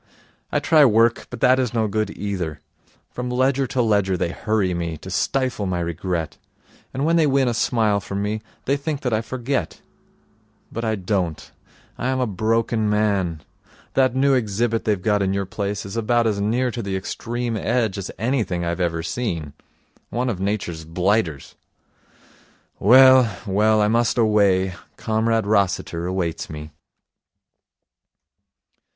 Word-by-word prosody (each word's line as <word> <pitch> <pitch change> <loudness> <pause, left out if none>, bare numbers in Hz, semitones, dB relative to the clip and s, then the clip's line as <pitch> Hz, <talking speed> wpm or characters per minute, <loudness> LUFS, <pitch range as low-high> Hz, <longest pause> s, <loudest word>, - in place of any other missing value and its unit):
I - - +1
try 155 -2 +5
work, 115 -2 +3
but 125 - -8
that 130 0 +5
is 125 -3 -1
no 110 -1 +2
good 110 +1 -1
either. 90 -7 -3 0.5
From 125 0 -4
ledger 130 +2 +1
to 125 0 0
ledger 100 -4 +2
they 85 - -1
hurry 105 -2 0
me, 85 -2 -3
to 95 - -10
stifle 130 0 -1
my 90 -1 -1
regret. 85 -1 -3 0.5
And 135 +2 -2
when 165 +1 +3
they 160 -2 +4
win 135 -1 +2
a 120 - +1
smile 110 -3 +1
from 100 0 -4
me, 105 +1 -2 0.2
they 140 +2 +1
think 145 0 -4
that 125 -3 -1
I 110 - +1
forget. 125 - -3 0.9
But 115 - -4
I 110 -1 0
don't. 90 -4 -2 0.5
I 125 - -1
am 130 0 0
a 125 - +2
broken 110 +1 0
man. 100 -7 0 0.5
That 130 -2 +2
new 135 +1 +3
exhibit 115 -1 0
they've 105 -3 +1
got 105 +2 +1
in 95 0 +1
your 100 0 -1
place 100 +1 -4
is 100 - -7
about 115 +1 +1
as 105 -3 0
near 120 +5 +1
to 120 - -4
the 100 -3 -3
Extreme 115 +4 -3
Edge 110 -4 0
as 95 - -5
anything 110 -7 -1
I've 85 +2 -2
ever 85 -2 -1
seen. 85 - -3 0.6
One 125 +1 -1
of 100 -6 -3
Nature's 95 -5 -2
blighters. 85 -2 -1 1.3
Well, 130 +1 +7
well, 105 +2 +3
I 105 - +3
must 115 +2 +1
away. 100 -4 +3 0.2
Comrade 110 0 0
Rossiter 90 -4 0
awaits 90 -3 -2
me.' 75 0 -8
110 Hz, 155 wpm, -22 LUFS, 95-120 Hz, 1.3 s, Well